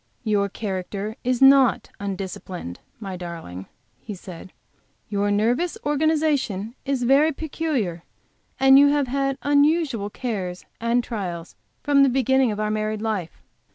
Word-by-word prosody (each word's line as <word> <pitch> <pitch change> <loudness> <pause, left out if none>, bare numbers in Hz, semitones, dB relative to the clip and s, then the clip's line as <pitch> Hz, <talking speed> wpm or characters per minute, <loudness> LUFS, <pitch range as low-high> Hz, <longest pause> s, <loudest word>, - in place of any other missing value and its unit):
"Your 205 -3 +1
character 200 +1 -4
is 255 +1 +1
not 270 -3 +5
undisciplined, 190 - -6 0.2
my 195 -4 -6
darling," 165 - -8 0.3
he 210 - -8
said. 185 0 -11 0.6
"Your 205 0 0
nervous 235 +12 +1
organization 290 -8 0
is 270 -3 -1
very 280 +6 +4
peculiar, 275 - -3 0.6
and 270 +1 +7
you 285 - +7
have 285 -1 +2
had 275 +1 -1
unusual 285 -6 +2
cares 195 -7 -4
and 235 +1 +1
trials 180 -7 -5 0.3
from 285 -1 +4
the 275 - +6
beginning 265 -1 +2
of 210 - -4
our 215 0 0
married 215 0 -2
life. 205 -7 -4
225 Hz, 130 wpm, -23 LUFS, 200-275 Hz, 0.6 s, and